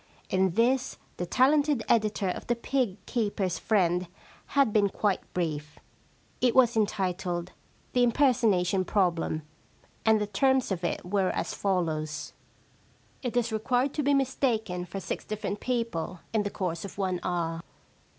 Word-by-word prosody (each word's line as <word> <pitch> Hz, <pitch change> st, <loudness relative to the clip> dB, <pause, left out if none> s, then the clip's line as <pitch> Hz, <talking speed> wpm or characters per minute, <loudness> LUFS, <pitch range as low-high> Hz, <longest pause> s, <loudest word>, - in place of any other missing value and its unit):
In 185 Hz, -2 st, +2 dB
this 250 Hz, +3 st, +2 dB, 0.2 s
the 175 Hz, -, -3 dB
talented 285 Hz, -, +3 dB
editor 215 Hz, -3 st, +2 dB
of -, -, -5 dB
The 240 Hz, -, +2 dB
Pig 235 Hz, -4 st, -1 dB
Keepers' 205 Hz, -6 st, -1 dB
Friend 180 Hz, -4 st, +2 dB, 0.4 s
had 275 Hz, -6 st, +2 dB
been 205 Hz, -2 st, +4 dB
quite 200 Hz, 0 st, 0 dB, 0.2 s
brief. 150 Hz, -4 st, -2 dB, 0.6 s
It 245 Hz, -2 st, +3 dB
was 245 Hz, -2 st, +5 dB
entitled 185 Hz, -4 st, -1 dB, 0.2 s
* -, -, -35 dB
The 250 Hz, -, +3 dB
Impersonation 225 Hz, -8 st, +3 dB
Problem,* 175 Hz, -5 st, 0 dB, 0.6 s
and 220 Hz, -1 st, +4 dB
the 210 Hz, -, 0 dB
terms 260 Hz, +4 st, +2 dB
of 180 Hz, -2 st, -2 dB
it 175 Hz, -, -2 dB
were 190 Hz, 0 st, +1 dB
as -, -, -2 dB
follows: 160 Hz, -5 st, -1 dB, 0.3 s
— -, -, -34 dB
* -, -, -34 dB
It 245 Hz, -2 st, -2 dB
is 235 Hz, -1 st, +1 dB
required 245 Hz, +5 st, +1 dB
to 300 Hz, -, -1 dB
be 285 Hz, 0 st, +3 dB
mistaken 225 Hz, -9 st, 0 dB
for 180 Hz, +3 st, -6 dB
six -, -, -4 dB
different 210 Hz, -1 st, -4 dB
people 230 Hz, -9 st, -2 dB
in 220 Hz, -, +3 dB
the 205 Hz, -, -2 dB
course 175 Hz, -5 st, -3 dB
of 200 Hz, -, -8 dB
one 185 Hz, -3 st, -1 dB
hour.' 165 Hz, -2 st, -2 dB
205 Hz, 155 wpm, -28 LUFS, 180-240 Hz, 0.6 s, was